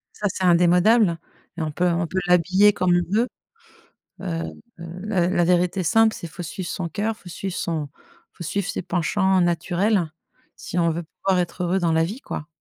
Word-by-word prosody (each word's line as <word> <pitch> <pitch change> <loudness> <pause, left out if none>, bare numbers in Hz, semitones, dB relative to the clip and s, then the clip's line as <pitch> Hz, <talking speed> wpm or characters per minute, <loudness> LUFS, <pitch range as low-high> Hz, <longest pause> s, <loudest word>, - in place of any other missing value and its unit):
Ça, 210 - -1
c'est 190 - -4
indémodable, 180 +2 +4 0.4
et - - -3
on 155 -1 -2
peut 180 +4 0
on 170 0 0
peut 185 - -1
l'habiller 185 +4 +5
comme 180 -3 +2
on 175 +2 -1
veut. 240 - +2 0.9
Heu - - -7 0.5
heu, 170 +1 -8
la 180 -5 +1
la 175 -2 +2
vérité 180 +2 +2
simple, 225 +5 +3
c'est 170 - -7
il - - -12
faut 175 - -7
suivre 175 +2 -5
son 175 -2 -3
cœur, 215 +5 -2
il - - -23
faut 180 - -11
suivre 185 +1 -5
son 155 -4 -2
il - - -29
faut 170 - -7
suivre 200 +4 -2
ses - - -3
penchants 190 +2 +1
naturels, 175 +1 +1 0.5
si 175 - -5
on 170 -1 +3
veut 170 +2 -3 0.2
pouvoir 190 -2 +2
être 180 +1 -3
heureux 180 +2 +1
dans 170 -2 +1
la 160 0 +3
vie, 215 +10 -5
quoi. 150 - -6
180 Hz, 210 wpm, -23 LUFS, 170-195 Hz, 0.9 s, l'habiller